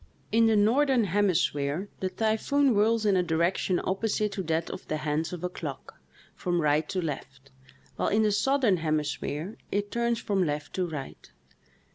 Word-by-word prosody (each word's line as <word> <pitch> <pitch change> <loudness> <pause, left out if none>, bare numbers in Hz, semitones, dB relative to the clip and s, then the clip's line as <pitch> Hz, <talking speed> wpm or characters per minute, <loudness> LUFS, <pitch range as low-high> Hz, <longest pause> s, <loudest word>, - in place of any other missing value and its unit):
In 225 +1 +4
the 220 - +4
northern 245 +4 +3
hemisphere 180 -4 +1
the 190 - -1
typhoon 225 +8 +1
whirls 220 0 +2
in 200 -2 +4
a 185 - +4
direction 175 +2 +1
opposite 210 +2 0
to 200 - -3
that 160 +1 -1
of 185 - -8
the 155 - -1
hands 155 +1 -1
of 180 -1 -6
a - - +1
clock, 150 -6 -8 0.3
from 175 -1 -1
right 150 0 +2
to 190 - -1
left, 135 -3 -6 0.5
while - - 0
in 215 +2 +3
the 210 - +3
southern 215 0 +2
hemisphere 155 +3 -2
it 205 0 -1
turns 235 0 0
from 200 -3 0
left 145 -2 -3
to 185 -2 -1
right. 145 -4 -7
185 Hz, 170 wpm, -28 LUFS, 155-215 Hz, 0.5 s, In